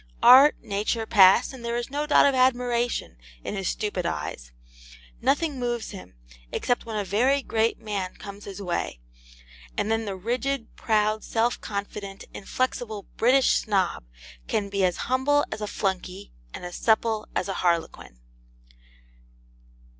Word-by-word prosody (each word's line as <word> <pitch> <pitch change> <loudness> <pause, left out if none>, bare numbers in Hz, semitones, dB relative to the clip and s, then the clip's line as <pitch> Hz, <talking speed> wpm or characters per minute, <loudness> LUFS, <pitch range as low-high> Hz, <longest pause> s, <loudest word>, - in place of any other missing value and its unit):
Art, 265 +4 +9
Nature 215 +3 -1
pass, 200 +4 +5
and 255 -3 -10
there 235 0 -2
is 240 +2 -4
no 295 +1 -2
dot 295 - +6
of 280 - +4
admiration 245 - +1 0.3
in - - -4
his 195 -2 -2
stupid 205 -4 -2
eyes: - - -4 0.7
nothing 290 -2 +1
moves 240 -2 -2
him, 185 - -11 0.4
except 245 -1 -1
when 220 -1 -3
a 205 - 0
very 255 +8 +2
great 225 0 0
man 200 -4 -4
comes 200 0 -10
his 200 0 -8
way, 175 - -3 0.8
and 215 - 0
then 225 0 0
the 200 -2 -4
rigid, 245 +5 -3
proud, 215 -1 +1
self 235 +1 0
confident, 200 -1 -6
inflexible 220 -1 -3
British 255 +3 +4
Snob 195 - 0 0.4
can 200 -2 -1
be 200 -1 0
as 180 -2 +1
humble 280 +3 +2
as 215 - -5
a 210 - -2
flunkey 190 -1 -3 0.2
and - - -8
as 175 - -6
supple 220 -1 +1
as - - 0
a 195 - -2
harlequin. 170 - -1
220 Hz, 145 wpm, -25 LUFS, 195-245 Hz, 0.8 s, Art